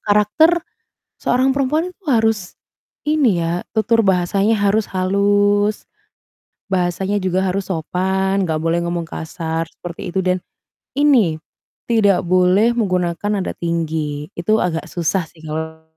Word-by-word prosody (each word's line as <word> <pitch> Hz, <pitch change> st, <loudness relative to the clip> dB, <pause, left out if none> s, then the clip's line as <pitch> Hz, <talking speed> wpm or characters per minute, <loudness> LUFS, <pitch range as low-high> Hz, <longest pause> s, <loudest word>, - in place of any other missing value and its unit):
karakter 310 Hz, +12 st, +3 dB, 0.6 s
seorang 255 Hz, +2 st, +2 dB
perempuan 295 Hz, +6 st, 0 dB
itu 375 Hz, -, -35 dB
harus 225 Hz, -6 st, +1 dB, 0.5 s
ini 285 Hz, -, +2 dB
ya, 170 Hz, +2 st, -2 dB
tutur 225 Hz, 0 st, +2 dB
bahasanya 195 Hz, +3 st, +2 dB
harus 205 Hz, +1 st, +2 dB
halus, 205 Hz, +2 st, +1 dB, 0.8 s
bahasanya 190 Hz, +2 st, 0 dB
juga 185 Hz, -1 st, 0 dB
harus 195 Hz, 0 st, -2 dB
sopan, 190 Hz, +3 st, 0 dB
nggak 160 Hz, -2 st, -1 dB
boleh 165 Hz, +1 st, +1 dB
ngomong 170 Hz, 0 st, -2 dB
kasar 160 Hz, 0 st, -4 dB
seperti 175 Hz, +1 st, -8 dB
itu 190 Hz, -, +1 dB
dan 185 Hz, 0 st, +1 dB, 0.6 s
ini, 250 Hz, -, +3 dB, 0.5 s
tidak 205 Hz, -5 st, +3 dB
boleh 185 Hz, +5 st, +4 dB
menggunakan 190 Hz, 0 st, 0 dB
nada -, -, -3 dB
tinggi, 155 Hz, -3 st, -2 dB
itu 215 Hz, +6 st, +2 dB
agak 175 Hz, 0 st, -1 dB
susah 170 Hz, +2 st, -1 dB
sih 160 Hz, -, -20 dB
kalo 160 Hz, +1 st, -5 dB
190 Hz, 125 wpm, -19 LUFS, 170-215 Hz, 0.8 s, boleh